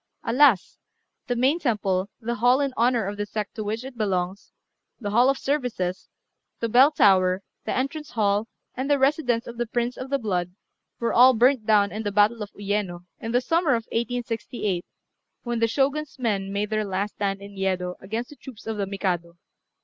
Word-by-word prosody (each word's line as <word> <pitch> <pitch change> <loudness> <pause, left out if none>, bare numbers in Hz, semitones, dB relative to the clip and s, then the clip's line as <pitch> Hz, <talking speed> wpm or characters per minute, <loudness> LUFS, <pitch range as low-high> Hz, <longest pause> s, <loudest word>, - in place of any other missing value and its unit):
Alas! 245 -5 +3 0.5
the 245 - 0
main 265 +7 +2
temple, 200 - 0
the 235 0 -3
hall 245 +2 +3
in 280 -2 0
honour 235 -2 +2
of 200 +1 -4
the 205 - -2
sect 210 -1 -4
to 220 - -4
which 220 +3 -3
it 265 -1 -9
belongs, 195 -3 -2 0.5
the 205 -4 -4
hall 240 +5 +5
of 275 - +1
services, 245 -12 -2 0.5
the 230 - -1
bell 255 +5 +6
tower, 190 -8 +3 0.2
the - - -2
entrance 285 +3 -3
hall, 210 -1 +1 0.3
and 260 +3 -3
the 285 - +4
residence 265 -4 +1
of 235 0 -9
the 240 - -1
prince 240 +2 -2
of 260 - -6
the 275 - +1
blood, 180 -7 -2 0.4
were 235 - 0
all 255 +1 +7
burnt 245 0 +3
down 205 -2 +4
in 215 - -4
the 205 -2 -2
battle 210 +3 +3
of 205 - -4
Uyéno, 200 -3 -2 0.2
in 225 - -4
the 245 +1 +3
summer 325 0 +2
of 230 -1 -3
1868, 230 -5 -2 0.6
when 240 -1 -2
the 230 - +3
Shogun's 280 +5 -1
men 200 -6 -1
made 205 +1 -2
their 215 0 +1
last 200 +1 -2
stand 195 -1 -2
in 200 0 -11
Yedo 185 -2 -1
against 225 +7 -5
the - - -11
troops 260 -6 -12
of 225 -1 -3
the 200 -1 -1
Mikado. 175 -4 -2
225 Hz, 195 wpm, -25 LUFS, 200-250 Hz, 0.6 s, all